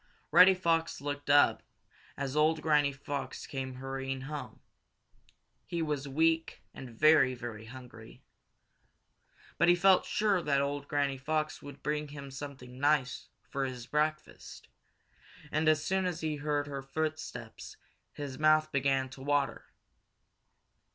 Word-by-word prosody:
Reddy 190 Hz, +1 st, +8 dB
Fox 165 Hz, -2 st, 0 dB
looked 145 Hz, +1 st, -5 dB
up 145 Hz, 0 st, +5 dB, 0.6 s
as 140 Hz, 0 st, -3 dB
old 155 Hz, +1 st, +2 dB
Granny 150 Hz, -2 st, +3 dB
Fox 135 Hz, -1 st, -5 dB
came 130 Hz, -2 st, -5 dB
hurrying 135 Hz, 0 st, -4 dB
home. 135 Hz, -5 st, -7 dB, 1.1 s
He 170 Hz, -1 st, -2 dB
was 150 Hz, -2 st, -2 dB
weak 160 Hz, +3 st, +1 dB
and 130 Hz, -, -9 dB
very, 130 Hz, +1 st, +4 dB
very 115 Hz, -3 st, -7 dB
hungry. 120 Hz, -2 st, -12 dB, 1.4 s
But 175 Hz, -, +4 dB
he 175 Hz, -, +6 dB
felt 190 Hz, +1 st, +4 dB
sure 205 Hz, -4 st, +1 dB
that 140 Hz, -3 st, +1 dB
old 140 Hz, 0 st, -2 dB
Granny 140 Hz, -2 st, 0 dB
Fox 155 Hz, +2 st, -2 dB
would 140 Hz, -1 st, -11 dB
bring 150 Hz, 0 st, -1 dB
him 140 Hz, -1 st, -9 dB
something 130 Hz, -2 st, -9 dB
nice 145 Hz, -3 st, +1 dB, 0.2 s
for 140 Hz, -1 st, -2 dB
his 125 Hz, -2 st, -6 dB
breakfast, 150 Hz, +3 st, -3 dB, 0.8 s
and 155 Hz, +1 st, +2 dB
as 155 Hz, -1 st, +2 dB
soon 190 Hz, 0 st, +1 dB
as 175 Hz, -2 st, -4 dB
he 155 Hz, -2 st, -2 dB
heard 145 Hz, 0 st, -1 dB
her 140 Hz, -1 st, -5 dB
footsteps 145 Hz, -5 st, -5 dB, 0.3 s
his 145 Hz, -2 st, -7 dB
mouth 155 Hz, 0 st, +4 dB
began 135 Hz, -1 st, +1 dB
to 130 Hz, +1 st, -12 dB
water. 140 Hz, -1 st, -1 dB
145 Hz, 135 wpm, -31 LUFS, 135-155 Hz, 1.4 s, Reddy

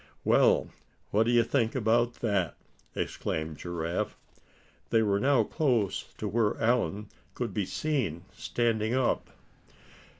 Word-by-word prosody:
"Well! -, -, +4 dB, 0.4 s
what 110 Hz, +3 st, +3 dB
d'ye 120 Hz, -1 st, +5 dB
think 115 Hz, -1 st, 0 dB
about 120 Hz, 0 st, +2 dB
that?" 100 Hz, -8 st, 0 dB, 0.4 s
exclaimed 80 Hz, -1 st, -3 dB
Giraffe. 85 Hz, -1 st, -3 dB, 0.7 s
They 115 Hz, -1 st, +3 dB
were 100 Hz, -2 st, +2 dB
now 135 Hz, -2 st, +4 dB
close 120 Hz, -, 0 dB
to -, -, -3 dB
where 110 Hz, -2 st, +1 dB
Allan 110 Hz, -3 st, +1 dB, 0.3 s
could 120 Hz, -2 st, -3 dB
be 105 Hz, -3 st, 0 dB
seen 120 Hz, -, -1 dB
standing 115 Hz, 0 st, 0 dB
up. 130 Hz, -2 st, +1 dB
115 Hz, 120 wpm, -29 LUFS, 100-120 Hz, 0.7 s, d'ye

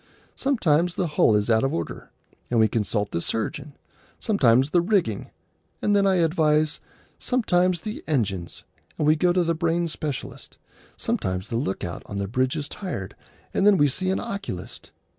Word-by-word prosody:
Sometimes 180 Hz, -, +1 dB
the 180 Hz, -, 0 dB
hull 150 Hz, -8 st, +3 dB
is 105 Hz, 0 st, +1 dB
out 110 Hz, +1 st, +3 dB
of 135 Hz, -, 0 dB
order, 85 Hz, -1 st, -5 dB, 0.4 s
and 120 Hz, -, +2 dB
we 110 Hz, -, +5 dB
consult 105 Hz, -1 st, -1 dB
the 85 Hz, -, -2 dB
surgeon; 140 Hz, -, -3 dB, 0.4 s
sometimes 135 Hz, -, +3 dB
the 175 Hz, -, +4 dB
rigging, 175 Hz, -, 0 dB, 0.5 s
and 205 Hz, -, +2 dB
then 200 Hz, -1 st, +4 dB
I 190 Hz, -, +3 dB
advise; 155 Hz, -3 st, +2 dB, 0.4 s
sometimes 180 Hz, -8 st, +1 dB
the 215 Hz, +2 st, -6 dB
engines, 100 Hz, -, -1 dB, 0.3 s
and 150 Hz, -, 0 dB
we 155 Hz, +1 st, +5 dB
go 175 Hz, +3 st, +2 dB
to 180 Hz, 0 st, +2 dB
the 170 Hz, 0 st, +1 dB
brain 170 Hz, +1 st, 0 dB
specialist; 150 Hz, -4 st, -6 dB, 0.4 s
sometimes 95 Hz, +1 st, -2 dB
the 115 Hz, -, -3 dB
look 115 Hz, -6 st, -2 dB
out 85 Hz, 0 st, -5 dB
on 100 Hz, -, -6 dB
the 100 Hz, 0 st, -2 dB
bridge 130 Hz, +4 st, 0 dB
is 145 Hz, -, -3 dB
tired, 170 Hz, -, -6 dB, 0.4 s
and -, -, +1 dB
then 205 Hz, -2 st, +6 dB
we 145 Hz, -, +5 dB
see 185 Hz, +7 st, -1 dB
an 190 Hz, -, +1 dB
oculist. 200 Hz, -, -6 dB
150 Hz, 175 wpm, -24 LUFS, 110-180 Hz, 0.5 s, then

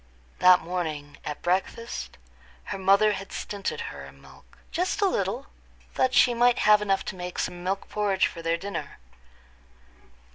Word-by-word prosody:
That 180 Hz, 0 st, +7 dB
morning, 155 Hz, -5 st, -4 dB
at 150 Hz, -, -6 dB
breakfast, 190 Hz, +6 st, -2 dB, 0.5 s
her 195 Hz, -, -5 dB
mother 200 Hz, +3 st, +5 dB
had 195 Hz, -1 st, -5 dB
stinted 200 Hz, -2 st, -4 dB
her -, -, -9 dB
in -, -, -15 dB
milk—just 360 Hz, +4 st, -5 dB
a 410 Hz, -, +3 dB
little—that 255 Hz, -, -2 dB
she 245 Hz, -, +6 dB
might 240 Hz, +1 st, +4 dB
have 210 Hz, 0 st, +5 dB
enough 195 Hz, -2 st, 0 dB
to 190 Hz, -, -5 dB
make 180 Hz, 0 st, -6 dB
some 175 Hz, 0 st, -3 dB
milk 195 Hz, +2 st, -2 dB
porridge 200 Hz, -2 st, +1 dB
for 170 Hz, -, -5 dB
their 165 Hz, 0 st, 0 dB
dinner. 170 Hz, -5 st, -6 dB
195 Hz, 145 wpm, -26 LUFS, 180-210 Hz, 0.5 s, That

